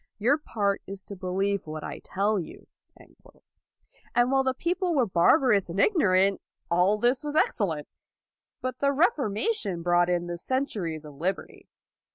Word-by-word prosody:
Your 255 +8 +2
part 200 -8 -1
is 195 0 -8
to 200 - -9
believe 195 +1 -2
what 155 0 -6
I - - -6
tell 205 +2 0
you.'' 170 - -9 1.5
And 240 +2 +3
while 270 0 +3
the 260 0 0
people 350 +3 -1
were 260 -4 +3
barbarous 200 - +3
and 175 +4 -4
ignorant, 195 - +3 0.3
all 180 +4 +3
this 245 +5 +1
was 295 0 -4
excellent. 165 - 0 0.7
But 255 0 -4
the 280 0 +2
Reformation 265 - 0
brought 175 0 +3
in 175 -1 0
the 175 0 -5
cen 260 +8 0
turies 165 - -5
of 150 - -10
liberty. 190 +3 -4
200 Hz, 155 wpm, -27 LUFS, 180-265 Hz, 1.5 s, And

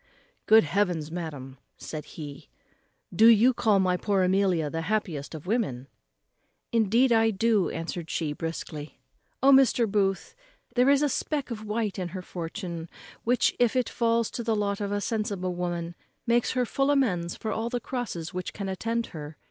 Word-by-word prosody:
"Good 220 +1 +7
heavens! 165 -2 0
madam," 145 -6 -6 0.2
said 155 -2 -7
he, 145 - -8 0.7
"do 220 +5 +7
you 235 +3 +6
call 215 -4 +3
my 185 -1 +2
poor 195 -1 +1
Amelia 185 -4 +2
the 165 +2 -3
happiest 165 -6 -2
of 155 - -9
women?" 180 - -1 0.8
"Indeed 230 +3 +3
I 225 -1 +4
do," 215 -2 +2
answered 165 0 -5
she 155 -3 -2
briskly. 155 -1 -6 0.5
"O 275 - +7
Mr. 265 -3 +5
Booth! 195 -2 0 0.4
there 250 +2 +4
is 280 +1 +4
a - - +4
speck 285 -1 -2
of 215 -2 -5
white 210 -2 -2
in 180 - -2
her 185 +1 -7
fortune, 170 -1 -6 0.4
which, 245 +2 +3
when 245 -1 +5
it 255 -2 +1
falls 230 -1 +1
to 240 - -4
the 225 -1 +1
lot 200 -1 -1
of 200 0 -2
a 205 0 -1
sensible 200 -5 -2
woman, 175 -1 -3 0.3
makes 235 0 +2
her 250 -1 +1
full 275 +4 0
amends 185 -12 +1
for 220 - -4
all 225 +1 -2
the 245 0 -2
crosses 210 -10 -5
which 180 0 -4
can 200 -2 -5
attend 230 +5 -2
her. 150 -1 -8
200 Hz, 170 wpm, -27 LUFS, 170-230 Hz, 0.8 s, Good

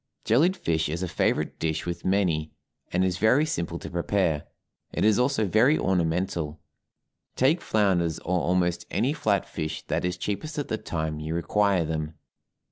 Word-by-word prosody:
Jellied 165 - +3
fish 80 - 0
is 85 +4 -3
a - - -1
favorite - - 0
dish 80 -1 -1
with 85 -1 -4
many, 85 -6 +1 0.4
and 90 +1 +2
is 90 -1 -1
very 125 +8 +4
simple 85 - -3
to - - -8
prepare; 85 -3 0 0.4
it - - 0
is 110 +1 +4
also 125 -3 +2
very 115 - +4
ornamental. 85 -3 0 0.8
Take 140 +7 +3
flounders 90 -7 +1
or 90 +1 -1
almost 90 -1 0
any - - +1
flat - - 0
fish 80 0 -4
that - - 0
is 90 0 -1
cheapest 130 - -4
at 145 - -3
the 110 - -1
time 80 -2 -3
you 80 +1 -3
require 95 +1 +2
them. 80 0 -3
90 Hz, 165 wpm, -26 LUFS, 80-105 Hz, 0.8 s, very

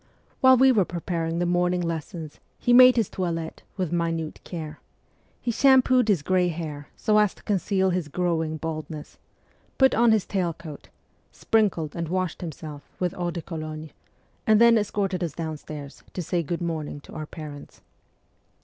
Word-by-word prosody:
While 260 0 +7
we 265 +1 +6
were 215 -6 +4
preparing 170 -1 -3
the 175 - +1
morning 180 +1 +1
lessons 165 -2 -5 0.2
he 245 - +2
made 255 0 +9
his 225 -5 +2
toilet 165 -3 -4 0.2
with 185 -4 -1
minute 165 -2 -2
care: 155 -3 -7 0.6
he 240 - -1
sham 265 +2 +5
pooed 255 -3 +3
his 190 -9 +2
grey 185 +2 +2
hair 155 -4 -5
so 215 -2 +2
as 210 -2 +2
to - - -20
conceal 190 -1 +1
his 175 -3 -1
growing 160 -1 -1
bald 155 0 -4
ness, 150 -2 -9 0.6
put 265 -2 +5
on 235 0 +4
his 215 -3 +2
tail 180 -4 -1
coat, 155 -3 -11 0.4
sprinkled 195 -9 0
and 170 -2 -3
washed 185 -1 -2
himself 155 -3 -7 0.2
with 180 -2 0
eau 175 -1 -2
de 170 -1 -5
cologne, 155 -2 -6 0.6
and 215 -1 +6
then 235 0 +7
escorted 195 -4 0
us 165 -4 -3
downstairs 150 -3 -7
to 180 - -3
say 175 +2 0
good 170 +2 -3
morning 155 -3 -3
to - - -14
our 155 -1 -6
parents. 150 -3 -10
175 Hz, 170 wpm, -25 LUFS, 160-195 Hz, 0.6 s, made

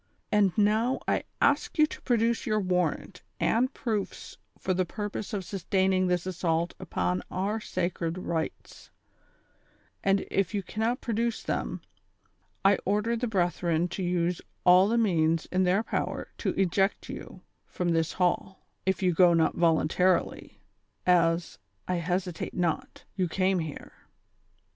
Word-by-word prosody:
And 205 -2 +4
now 220 +5 +2
I - - +2 0.2
ask 285 +1 +2
you 305 - +7
to - - -9
produce 235 +1 +1
your 215 -1 +2
warrant 180 -1 -1 0.2
and 250 +4 +2
proofs 220 -7 -4 0.2
for 185 - -1
the 185 +1 +1
purpose 205 +3 -5
of 200 -4 -3
sustaining 190 0 +1
tliis 180 -1 0
assault 170 -2 -1
upon 90 - -1
our 205 +4 -1
sacred 175 -4 -2
rights; 165 -3 -4 1.1
and, 195 0 +2
if 195 +1 0
you 200 - -1
cannot 225 +6 -1
produce 230 0 -1
them, - - -3 0.8
I 195 0 +5
order 210 +4 +1
the 245 +1 -1
brethren 175 -4 +1
to 190 - -5
use 175 -1 0 0.2
all 180 +2 +7
the 230 +2 +1
means 165 -7 +2
in 185 0 +2
their 190 +4 +2
power - - -3
to - - -1
eject 195 +1 +1
you - - -9 0.2
from 180 -1 -2
this 165 -1 +1
hall, 185 +1 -1 0.2
if 190 0 +1
you 180 -1 +3
go 175 0 +5
not 160 -1 +3
voluntarily, 170 +2 +1 0.4
as, 170 -1 +2 0.3
I 180 - 0
hesitate 180 0 -2
not, 175 -3 -2
you 185 -2 0
came 185 +2 +1
here. 160 -3 -6
185 Hz, 140 wpm, -28 LUFS, 175-210 Hz, 1.1 s, you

